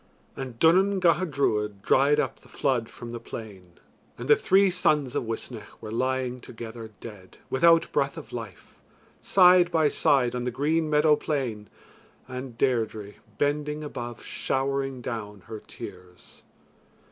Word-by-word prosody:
And 130 -3 -6
Duanan 190 +7 +4
Gacha 175 0 +3
Druid 105 -8 -1
dried 145 +3 +4
up - - -2
the - - -20
flood 120 -5 -1
from 120 -1 -9
the 120 - -5
plain 100 -6 -10 0.4
and - - -6
the - - +7
three 195 0 +4
sons 150 -7 +1
of 135 - -1
Uisnech 115 0 -7
were 110 - -8
lying 130 +1 -1
together 115 -1 -9
dead, 100 -5 -11
without 165 +4 +4
breath 140 +3 0
of 160 - -10
life, 110 -6 -9 0.4
side 180 -2 +6
by 160 -3 +3
side 130 -5 +2
on 125 0 -3
the 125 - -1
green 155 +5 0
meadow 150 0 +4
plain 130 -9 -3 0.6
and 125 -1 -7
Deirdre 110 -5 -1 0.2
bending 150 +1 -1
above 120 -5 -6
showering 135 -1 -2
down 105 -4 -6
her 110 +1 -8
tears. 90 -3 -12
130 Hz, 145 wpm, -26 LUFS, 115-150 Hz, 0.6 s, the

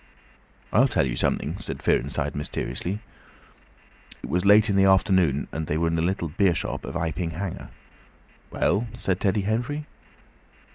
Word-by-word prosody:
"I'll 125 +7 +5
tell 110 - +1
you - - -2
something," 80 +7 0
said 90 - -6
Fearenside, - - 0
mysteriously. 90 +6 -4 1.2
It - - -6
was 90 +2 +1
late 105 +2 +6
in 100 - +1
the 95 0 +5
afternoon, 95 -6 +3
and 80 0 -4
they 75 - 0
were 85 - +1
in - - -2
the 80 - 0
little 90 0 -1
beer 90 +2 +2
shop - - -3
of - - -7
Iping 85 0 -2
Hanger. 90 +2 -5 0.8
"Well?" 110 +4 0
said 95 -1 -1
Teddy 100 +1 +1
Henfrey. 120 +9 -2
95 Hz, 155 wpm, -25 LUFS, 85-100 Hz, 1.2 s, late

